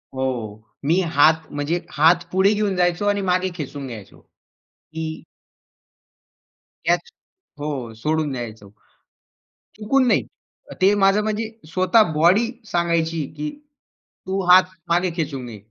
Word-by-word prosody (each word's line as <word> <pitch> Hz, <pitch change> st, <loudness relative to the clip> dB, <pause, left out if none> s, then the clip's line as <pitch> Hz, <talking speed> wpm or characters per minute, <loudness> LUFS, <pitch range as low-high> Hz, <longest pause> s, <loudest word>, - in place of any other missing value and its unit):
हो. 115 Hz, -5 st, -3 dB, 0.2 s
मी 170 Hz, +5 st, +3 dB, 0.2 s
हात 155 Hz, +2 st, +4 dB
म्हणजे 145 Hz, +4 st, -1 dB
हात 165 Hz, +3 st, +4 dB
पुढे 190 Hz, +3 st, +3 dB
घेऊन 205 Hz, -2 st, 0 dB
जायचो 175 Hz, +2 st, +1 dB
आणि 205 Hz, 0 st, +1 dB
मागे 185 Hz, 0 st, +1 dB
खेचून 145 Hz, -4 st, -6 dB
घ्यायचो, 110 Hz, -5 st, -10 dB, 0.5 s
की 160 Hz, 0 st, -7 dB, 1.7 s
कॅच -, -, +1 dB, 0.5 s
हो 135 Hz, -6 st, -4 dB
सोडून 155 Hz, +5 st, -1 dB
द्यायचो. 110 Hz, -5 st, -7 dB, 1.1 s
चुकून 255 Hz, +4 st, +2 dB
नाही. -, -, +3 dB, 0.6 s
ते 195 Hz, +2 st, +5 dB
माझं 200 Hz, +1 st, +3 dB
म्हणजे 215 Hz, +1 st, -2 dB, 0.2 s
स्वतः 185 Hz, +1 st, +3 dB
बॉडी 185 Hz, +10 st, +3 dB
सांगायची 165 Hz, -3 st, 0 dB
की, 150 Hz, 0 st, -3 dB, 0.8 s
तू 190 Hz, +1 st, -1 dB
हात 185 Hz, +1 st, +9 dB, 0.3 s
मागे 175 Hz, +2 st, +2 dB
खेचून 140 Hz, -6 st, -3 dB
घे 110 Hz, -3 st, -9 dB
165 Hz, 120 wpm, -22 LUFS, 145-190 Hz, 1.7 s, हात